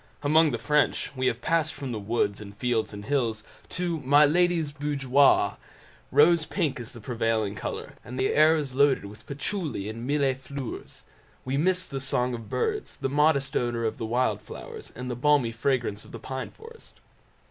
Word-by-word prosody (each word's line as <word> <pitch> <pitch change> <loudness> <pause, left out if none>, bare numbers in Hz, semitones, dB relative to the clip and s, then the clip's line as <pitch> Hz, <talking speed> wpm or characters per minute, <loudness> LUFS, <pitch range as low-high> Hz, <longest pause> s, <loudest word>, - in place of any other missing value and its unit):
Among 155 +2 +5
the 120 - -2
French 150 +1 +1
we 130 0 0
have 115 0 -1
passed 165 -1 +1
from 135 -2 -5
the 110 - -3
woods, 105 -1 -1
and 100 0 -10
fields, 120 -1 0
and 100 -1 -8
hills, 115 -6 0 0.3
to 175 -3 -2
my 145 +2 +5
lady's 170 -1 +2
boudoir—rose 145 +2 +2
pink 145 -5 -1
is 120 - -6
the 120 - -9
prevailing 115 -3 -1
colour, 100 - -5
and 125 +5 -8
the 130 - +1
air 155 +2 +6
is 145 -4 -3
loaded 135 -4 +3
with 105 +2 -12
patchouli 145 - -3
and 115 +3 -6
mille 140 -2 +2
fleurs. 130 0 -8 0.4
We 130 +1 -1
miss 180 +5 +2
the 135 - -5
song 125 -1 0
of 115 -3 -7
birds, 430 -2 -2
the 135 - -3
modest 145 -1 +2
odour 120 -1 0
of 110 - -2
wild 115 -2 0
flowers, - - -9
and 125 +2 -6
the - - -3
balmy 135 -2 +3
fragrance 115 -3 -1
of - - -15
the - - -6
pine 130 0 -5
forest. 455 +1 -14
135 Hz, 180 wpm, -27 LUFS, 115-150 Hz, 0.4 s, air